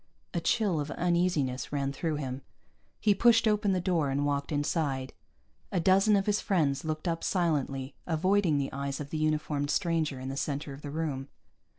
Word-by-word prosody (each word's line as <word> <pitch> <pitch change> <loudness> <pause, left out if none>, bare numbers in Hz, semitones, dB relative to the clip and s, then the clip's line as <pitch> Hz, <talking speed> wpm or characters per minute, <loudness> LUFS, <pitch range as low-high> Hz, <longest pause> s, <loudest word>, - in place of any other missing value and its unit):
A 170 - -1
chill 185 0 +1
of 145 0 -3
uneasiness 170 -7 0
ran 140 -1 -1
through 155 +2 -2
him; 135 -2 -4 0.6
he 210 -1 +4
pushed 230 +2 +5
open 210 -1 +2
the 185 - +1
door 170 -5 +1
and 140 +2 0
walked 140 0 -1
inside. 145 -3 -1 0.6
A 185 - +1
dozen 195 +4 +4
of 195 -1 +2
his 210 0 +1
friends 145 -8 +1
looked 155 +2 -3
up 165 -1 -1
silently, 140 -7 0
avoiding 180 0 +2
the 140 -1 -2
eyes 140 0 -3
of 145 -1 -6
the 155 - -2
uniformed 155 -2 0
stranger 165 -7 0
in 130 +1 -5
the 135 - -4
center 145 0 -3
of 135 - -10
the 145 - -6
room. 145 -3 -3
155 Hz, 185 wpm, -29 LUFS, 140-180 Hz, 0.6 s, pushed